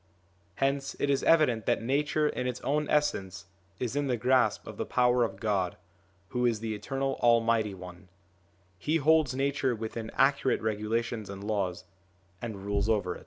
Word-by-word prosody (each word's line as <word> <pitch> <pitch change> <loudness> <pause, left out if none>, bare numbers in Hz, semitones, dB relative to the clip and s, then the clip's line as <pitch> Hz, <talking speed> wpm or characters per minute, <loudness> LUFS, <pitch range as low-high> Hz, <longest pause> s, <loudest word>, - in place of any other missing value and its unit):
Hence 135 +2 -1
it 140 - +1
is 135 - +1
evident 130 -10 +3
that - - +1
Nature 150 +4 +1
in 125 - -2
its 125 - -3
own 150 +2 0
essence 100 -10 0 0.3
is 125 +1 -3
in 145 -1 0
the 125 -2 0
grasp 125 +2 +2
of - - -9
the - - -2
power 125 -1 +3
of 95 -4 -3
God, 100 -4 -1 0.5
who 125 +3 -1
is 115 -3 +2
the 110 0 -3
Eternal 135 +6 -2
Almighty 115 -3 +3
One: 90 0 -11 0.7
He 155 - 0
holds 155 -3 +3
Nature 135 -2 0
within 110 0 -5
accurate 135 -1 +2
regula 110 +1 0
tions 115 -3 -6
and 100 0 -7
laws, 95 -4 -2 0.6
and 105 -4 -6
rules 100 +1 0
over 100 -5 +1
it. - - -10
115 Hz, 170 wpm, -29 LUFS, 105-135 Hz, 0.7 s, evident